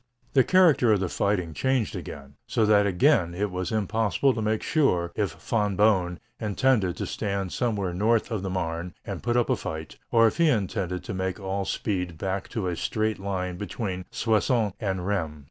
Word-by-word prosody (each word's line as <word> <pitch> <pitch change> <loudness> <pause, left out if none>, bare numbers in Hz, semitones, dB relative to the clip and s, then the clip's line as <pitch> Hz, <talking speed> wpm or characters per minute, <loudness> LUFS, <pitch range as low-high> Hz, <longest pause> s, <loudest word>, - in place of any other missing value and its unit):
The 130 - +6
character 165 -10 +5
of 105 - +4
the 95 -2 -1
fighting 90 -5 0
changed 130 - 0
again, 70 -1 -8
so 110 - +2
that 105 -1 +4
again 90 - +3
it 100 +1 -1
was 90 -1 -3
impossible 110 +5 +1
to 115 - -3
make 110 0 0
sure 90 - +1
if 100 -7 -1
Von 105 +5 -1
Boehm 95 -4 +3 0.2
intended 105 -3 +1
to - - -3
stand 100 -2 -3
somewhere 105 -7 -1
north 110 +6 +1
of 110 -4 -1
the 95 - -3
Marne 85 -2 -3
and - - -5
put 120 0 0
up 120 - +2
a - - +4
fight, 80 0 -6
or 115 -1 +5
if 110 - +1
he 170 -2 +4
intended 95 - -1
to - - -5
make 95 0 -2
all 95 0 -2
speed 90 -6 -2
back 95 +2 -3
to 110 -5 -3
a 90 - -1
straight 110 +4 -1
line 90 -2 -3
between 95 -2 -4
Soissons 110 -1 +1
and 95 -4 -2
Rheims. 80 -7 -2
100 Hz, 190 wpm, -26 LUFS, 90-110 Hz, 0.2 s, The